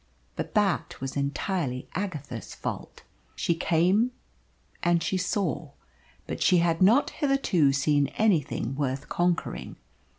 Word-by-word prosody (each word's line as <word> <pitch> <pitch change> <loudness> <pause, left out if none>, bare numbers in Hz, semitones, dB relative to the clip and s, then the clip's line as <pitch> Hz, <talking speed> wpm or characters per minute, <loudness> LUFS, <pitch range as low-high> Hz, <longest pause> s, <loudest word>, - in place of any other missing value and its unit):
But - - -5
that - - +1
was 135 0 -5
entirely 140 -1 -2
Agatha's 150 - -5
fault. - - -6 0.3
She 170 - +1
came, 180 +7 +2 0.7
and 175 -1 +2
she 170 - -1
saw, 180 -5 -1 0.5
but - - -5
she 180 - +5
had 170 0 +2
not 230 +10 +5
hitherto 275 - +2
seen 140 +1 +2
anything 160 - +1
worth 140 0 -2
conquering. 170 - -1
165 Hz, 120 wpm, -27 LUFS, 140-185 Hz, 0.7 s, she